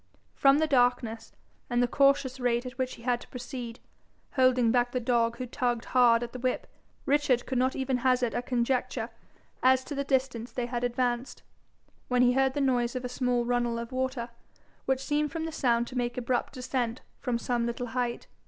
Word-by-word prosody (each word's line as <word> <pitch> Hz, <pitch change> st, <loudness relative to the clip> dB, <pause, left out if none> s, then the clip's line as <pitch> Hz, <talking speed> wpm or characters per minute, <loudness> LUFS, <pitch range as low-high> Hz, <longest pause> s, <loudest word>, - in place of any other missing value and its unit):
From 275 Hz, 0 st, +5 dB
the 315 Hz, -, +3 dB
darkness, 245 Hz, -5 st, +1 dB, 0.4 s
and 240 Hz, -, +1 dB
the -, -, +2 dB
cautious 275 Hz, 0 st, +2 dB
rate 245 Hz, 0 st, +1 dB
at 250 Hz, 0 st, -7 dB
which 255 Hz, 0 st, -1 dB
he 230 Hz, -, -15 dB
had 245 Hz, -1 st, 0 dB
to -, -, -12 dB
proceed, 245 Hz, -2 st, -7 dB, 0.5 s
holding 255 Hz, -3 st, +3 dB
back 245 Hz, 0 st, +1 dB
the 250 Hz, -, +1 dB
dog 235 Hz, -1 st, +1 dB
who 255 Hz, -, -4 dB
tugged 240 Hz, -1 st, -1 dB
hard 240 Hz, -2 st, +5 dB
at 240 Hz, -, -7 dB
the 255 Hz, -, -6 dB
whip, 255 Hz, 0 st, -1 dB, 0.4 s
Richard 275 Hz, -4 st, +2 dB
could 260 Hz, -2 st, -1 dB
not 260 Hz, +1 st, +1 dB
even 265 Hz, -1 st, 0 dB
hazard 250 Hz, -1 st, +2 dB
a -, -, -1 dB
conjecture 245 Hz, -1 st, -1 dB, 0.5 s
as 260 Hz, 0 st, +4 dB
to 290 Hz, -, -6 dB
the 280 Hz, 0 st, -1 dB
distance 255 Hz, -4 st, -1 dB
they 245 Hz, +1 st, -2 dB
had 240 Hz, 0 st, -3 dB
advanced, 245 Hz, +1 st, -1 dB, 0.6 s
when 250 Hz, 0 st, +3 dB
he 245 Hz, -, +5 dB
heard 265 Hz, 0 st, +2 dB
the 290 Hz, -, 0 dB
noise 245 Hz, -3 st, +1 dB
of 255 Hz, 0 st, -3 dB
a -, -, -3 dB
small 250 Hz, -1 st, 0 dB
runnel 240 Hz, -1 st, 0 dB
of 235 Hz, +1 st, -5 dB
water, 255 Hz, -2 st, -2 dB, 0.6 s
which 265 Hz, 0 st, 0 dB
seemed 295 Hz, 0 st, 0 dB
from 325 Hz, -1 st, -3 dB
the 325 Hz, -, -4 dB
sound 240 Hz, -6 st, +1 dB
to 255 Hz, -, -10 dB
make 240 Hz, -1 st, -1 dB
abrupt 250 Hz, 0 st, -1 dB
descent 250 Hz, -2 st, -2 dB, 0.2 s
from 245 Hz, -3 st, -1 dB
some 235 Hz, 0 st, -1 dB
little 235 Hz, +1 st, -3 dB
height. 245 Hz, -2 st, -2 dB
250 Hz, 200 wpm, -28 LUFS, 240-260 Hz, 0.6 s, From